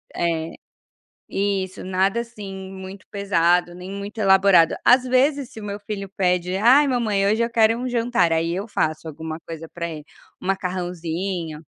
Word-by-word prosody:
é, 165 -1 -1 0.8
isso, 195 -2 -2
nada 190 +4 +1
assim 195 -5 -8
muito 190 0 -9
pesado, 175 -3 +2
nem 180 +2 -9
muito 200 +3 -7
elaborado, 190 -4 +5
às 250 +1 +6
vezes 265 +1 +2
se 225 - -11
o - - -8
meu 205 0 -5
filho 200 -1 -5
pede: 180 -1 +1
"Ai 255 +8 +6
mamãe 215 -6 +1
hoje 220 +3 +2
eu 235 - 0
quero 225 0 +4
um 255 +1 -3
jantar", 235 -7 +1
aí 165 +1 +1
eu 200 +5 -4
faço 155 -3 -1
alguma 160 +1 -6
coisa 165 -1 -7
para 170 -1 -3
ele, 155 -2 -7 0.4
um - - -8
macarrãozinho. 180 -3 -3
195 Hz, 165 wpm, -22 LUFS, 175-215 Hz, 0.8 s, às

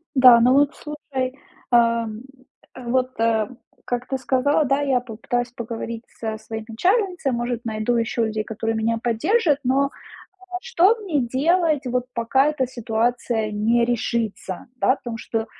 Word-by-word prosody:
Да, 250 -3 +8
ну 245 +2 +5
вот 280 +1 +3
слушай, 275 -4 -5 0.4
эм, 230 -2 +2 0.5
вот, 255 +1 -1
э, 225 -2 +2 0.4
как 245 0 -3
ты 270 - -2
сказала, 280 +4 +2
да, 275 +1 +1
я 270 -3 +2
попытаюсь 245 +1 -3
поговорить 230 -1 -6 0.2
со 220 -1 -3
своей 220 0 -7
начальницей, 360 - +1
может, 240 0 -2
найду 220 +1 -1
ещё 230 0 0
людей, 215 -1 -2
которые 225 +1 -3
меня 225 +1 0
поддержат, 300 - +2
но 275 +2 +2 0.7
что 450 -2 +4
мне 345 -9 0
делать 295 +3 +1
вот, 250 0 -1
пока 245 +4 +2
эта 300 -4 0
ситуация 235 -2 -1
не 225 +3 +2
решится, 230 -5 -2
да, 255 - +2
потому 235 -4 -7
что, 225 0 -3
245 Hz, 140 wpm, -22 LUFS, 225-275 Hz, 0.7 s, Да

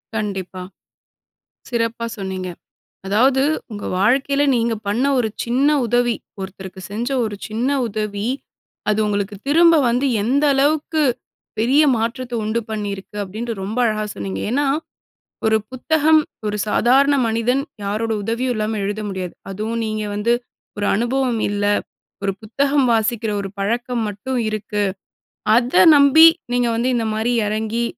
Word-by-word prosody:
கண்டிப்பா. 195 -4 -4 1.1
சிறப்பா 230 -1 -1
சொன்னீங்க. 190 -2 -4 0.6
அதாவது 255 +7 +3 0.3
உங்க 205 -1 -6
வாழ்க்கையில 275 +6 +2
நீங்க 230 -1 +1
பண்ண 230 +6 +1
ஒரு 235 -3 +1
சின்ன 255 +5 +2 0.2
உதவி, 240 0 +2 0.3
ஒருத்தருக்கு 190 0 -8
செஞ்ச 235 +5 -2 0.2
ஒரு 210 -2 -4
சின்ன 230 +5 -1 0.2
உதவி, 210 0 -3 0.6
அது 210 +1 +2
உங்களுக்கு 205 0 -2
திரும்ப 335 +3 +6
வந்து 245 +4 +1 0.2
எந்த 275 +6 +1
அளவுக்கு 305 +3 +1 0.6
பெரிய 265 +7 +4
மாற்றத்த 240 +2 -3
உண்டு 220 +2 0
பண்ணியிருக்கு 205 -2 -5
அப்பிடின்ட்டு 220 +5 -4
ரொம்ப 210 +5 -4
அழகா 215 -1 0
சொன்னீங்க. 95 -1 -4
ஏன்னா, 285 +4 +1 0.8
ஒரு 220 0 +4
புத்தகம் 310 +4 +3 0.3
ஒரு 210 - -2
சாதாரண 270 +6 +4
மனிதன் 230 +4 +1 0.2
யாரோட 215 +3 -1
உதவியும் 240 +4 -1
இல்லாம 215 0 -1
எழுத 205 +2 -3
முடியாது. 185 -2 -5 0.2
அதுவும் 220 +4 -3
நீங்க 215 0 -2
வந்து 210 +3 +1 0.5
ஒரு 205 - -1
அனுபவம் 240 +1 0
இல்ல, 205 0 -1 0.6
ஒரு 195 - +1
புத்தகம் 275 +4 +1
வாசிக்கிற 225 0 0
ஒரு 195 - -5
பழக்கம் 235 +3 -1
மட்டும் 210 +6 -3
இருக்கு. 210 -1 -2 0.7
அத 245 +6 +4
நம்பி 285 +3 +8 0.3
நீங்க 245 -1 +2
வந்து 235 +2 0
இந்த 230 - 0
மாரி 225 +3 0
இறங்கி, 220 +2 -1
225 Hz, 130 wpm, -20 LUFS, 210-255 Hz, 1.1 s, நம்பி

